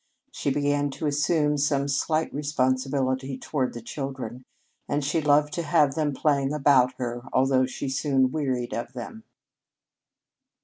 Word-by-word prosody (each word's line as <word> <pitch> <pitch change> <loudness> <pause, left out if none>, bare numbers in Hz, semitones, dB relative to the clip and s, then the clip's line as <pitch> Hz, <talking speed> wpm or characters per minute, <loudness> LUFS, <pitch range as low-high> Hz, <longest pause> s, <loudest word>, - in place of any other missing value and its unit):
She - - -2
began 145 +1 +1
to - - -3
assume 150 0 +1
some 140 -1 +1
slight 155 +3 0
responsibility 130 -1 0
toward 130 -2 -2
the 120 - -7
children, 130 -2 -6 0.4
and 145 0 0
she 155 +3 +1
loved 150 0 +3
to 170 - -1
have 150 -3 +3
them 150 0 0
playing 140 0 +1
about 135 -3 +4
her, 120 -1 -4
although 130 0 +3
she 135 - -5
soon 135 -1 +1
wearied 130 -5 -2
of 120 +1 -4
them. 175 - -8
140 Hz, 140 wpm, -26 LUFS, 130-150 Hz, 0.4 s, about